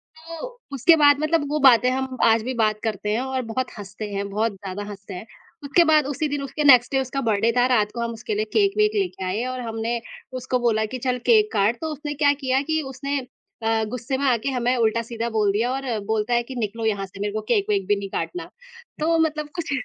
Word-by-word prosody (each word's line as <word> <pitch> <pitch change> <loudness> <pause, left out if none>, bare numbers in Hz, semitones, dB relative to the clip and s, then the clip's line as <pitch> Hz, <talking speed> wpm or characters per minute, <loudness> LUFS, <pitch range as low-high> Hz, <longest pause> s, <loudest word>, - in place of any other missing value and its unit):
तो 330 +5 -8 0.3
उसके 275 +5 +5
बाद 290 -2 +5
मतलब 310 0 +1
वो 305 +1 0
बातें 250 -3 +6
हम 265 0 -3
आज 225 0 +5
भी 255 +3 -3
बात 215 -3 +1
करते 215 -2 -2
हैं 230 - 0
और 265 0 -2
बहुत 250 +2 -3
हँसते 205 +1 -7
हैं, 200 0 -3
बहुत 215 +3 0
ज़्यादा 195 +1 -6
हँसते 200 -1 -9
हैं। 180 +4 -7 0.4
उसके 280 +5 +4
बाद 310 -3 +4
उसी 290 +2 -1
दिन 285 0 -2
उसके 275 +2 -3
नेक्स्ट 255 -4 +6
डे 270 - +2
उसका 265 +1 -3
बर्थडे 225 -1 +2
था, 245 - +5
रात 215 -5 +2
को 235 - -5
हम 235 - -2
उसके 225 -1 -5
लिए 215 +1 0
केक-वेक 425 +1 +3
लेके 385 - -1
आए 195 +6 -1
और 255 0 -4
हमने 225 +1 -2 0.4
उसको 255 0 -1
बोला 225 -3 +1
कि 255 +4 -5
चल 250 -1 +1
केक 430 -2 +4
काट, 210 +4 +2
तो 320 - -2
उसने 295 0 -5
क्या 285 0 +3
किया 265 -2 0
कि 315 +2 -1
उसने 280 +2 -3 0.4
अ, 225 0 +1
गुस्से 250 +2 -3
में 280 - -1
आके 235 +2 0
हमें 250 0 +1
उल्टा-सीधा 230 0 0
बोल 215 -3 +1
दिया 225 +5 0
और 270 +1 -3 0.2
बोलता 220 +2 0
है 240 0 +2
कि 260 +2 -9
निकलो 225 -1 -3
यहाँ 200 -3 0
से, 195 +1 -14
मेरे 205 0 -2
को 215 - -2
केक-वेक 205 -3 0
भी 205 - +3
नहीं 200 -1 -6
काटना 355 - -4 0.5
तो 330 +2 +2
मतलब 305 -2 0
कुछ 335 -4 -4
245 Hz, 230 wpm, -23 LUFS, 220-285 Hz, 0.5 s, बातें